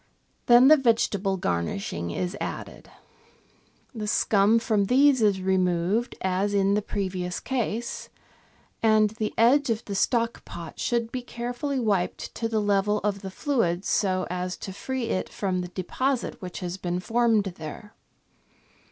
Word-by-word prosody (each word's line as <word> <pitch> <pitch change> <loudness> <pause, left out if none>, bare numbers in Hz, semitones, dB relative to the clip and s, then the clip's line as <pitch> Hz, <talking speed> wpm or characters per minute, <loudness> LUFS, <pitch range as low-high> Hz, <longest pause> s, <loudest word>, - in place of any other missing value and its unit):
Then 240 +2 +8
the 310 +2 +8
vegetable 215 -6 +1
garnishing 85 - -2
is 180 - -3
added. - - -6 1.0
The 215 -3 -5
scum 210 +1 +3
from 215 -3 +1
these 265 +3 +4
is 200 -3 +2
removed 185 +4 +1
as 190 +2 0
in 195 0 +3
the 210 - +2
previous 185 -3 -3
case, 235 -3 -3 0.7
and 215 -2 +4
the 220 -1 -3
edge 260 +5 +4
of 225 0 -1
the 200 - -5
stock 230 +3 0
pot 170 -2 -9
should 235 -2 -1
be 255 - -3
carefully 245 +3 -3
wiped 200 -6 -1
to 225 - -3
the 220 -1 0
level 205 0 +2
of 200 -1 -1
the 190 - -6
fluid, 190 - -1
so 185 -2 +1
as 180 0 -3
to 190 - -7
free 260 +5 -3
it 185 - -1
from 185 -3 -2
the 180 - -5
deposit 235 +10 -2
which 180 0 -7
has 180 0 -4
been 180 -1 -2
formed 225 +1 +2 0.2
there. 160 +8 -8
205 Hz, 150 wpm, -26 LUFS, 185-235 Hz, 1.0 s, Then